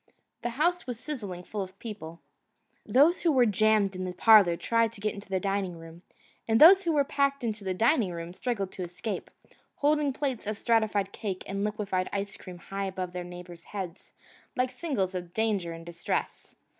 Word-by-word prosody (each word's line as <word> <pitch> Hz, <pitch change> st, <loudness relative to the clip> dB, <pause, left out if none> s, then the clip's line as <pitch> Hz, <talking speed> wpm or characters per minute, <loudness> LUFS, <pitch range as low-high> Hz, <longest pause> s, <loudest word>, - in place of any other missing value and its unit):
The 240 Hz, -, -2 dB
house 350 Hz, +2 st, +1 dB
was 245 Hz, -3 st, -4 dB
sizzling 205 Hz, -, -5 dB
full 210 Hz, +2 st, -4 dB
of 190 Hz, 0 st, -7 dB
people. 170 Hz, -8 st, -8 dB, 0.7 s
Those 295 Hz, +8 st, +4 dB
who 335 Hz, -, +3 dB
were 255 Hz, -4 st, +5 dB
jammed 215 Hz, -2 st, +3 dB
in 185 Hz, -, -4 dB
the 180 Hz, -1 st, -4 dB
parlour 195 Hz, -3 st, +6 dB
tried 230 Hz, +2 st, +1 dB
to 220 Hz, -, -11 dB
get 210 Hz, +1 st, -1 dB
into 200 Hz, -2 st, -10 dB
the 190 Hz, -1 st, 0 dB
dining 195 Hz, -3 st, -2 dB
room, 165 Hz, +1 st, -12 dB, 0.5 s
and 225 Hz, 0 st, +3 dB
those 375 Hz, +5 st, +9 dB
who 340 Hz, -3 st, 0 dB
were 290 Hz, -2 st, +4 dB
packed 280 Hz, -1 st, 0 dB
in 230 Hz, -, +1 dB
the 200 Hz, -3 st, -4 dB
dining 230 Hz, -, +3 dB
room 170 Hz, 0 st, -6 dB
struggled 200 Hz, -3 st, -2 dB
to -, -, -8 dB
escape, 180 Hz, +4 st, -5 dB, 0.5 s
holding 295 Hz, -1 st, +2 dB
plates 260 Hz, -5 st, -3 dB
of 215 Hz, -1 st, -2 dB
stratified 215 Hz, -4 st, +1 dB
cake 195 Hz, -4 st, -4 dB
and 195 Hz, +1 st, -3 dB
liquefied 205 Hz, -3 st, -1 dB
ice 200 Hz, 0 st, -3 dB
cream 180 Hz, -1 st, -10 dB
high 195 Hz, +3 st, -5 dB
above 185 Hz, -2 st, -4 dB
their 180 Hz, 0 st, -4 dB
neighbours' 175 Hz, -1 st, -10 dB
heads 190 Hz, -5 st, -7 dB, 0.4 s
like 250 Hz, 0 st, +1 dB
signals 250 Hz, -, -2 dB
of 175 Hz, -1 st, -6 dB
danger 210 Hz, -6 st, 0 dB
and 165 Hz, 0 st, -9 dB
distress. 170 Hz, -1 st, -4 dB
200 Hz, 190 wpm, -28 LUFS, 185-240 Hz, 0.7 s, those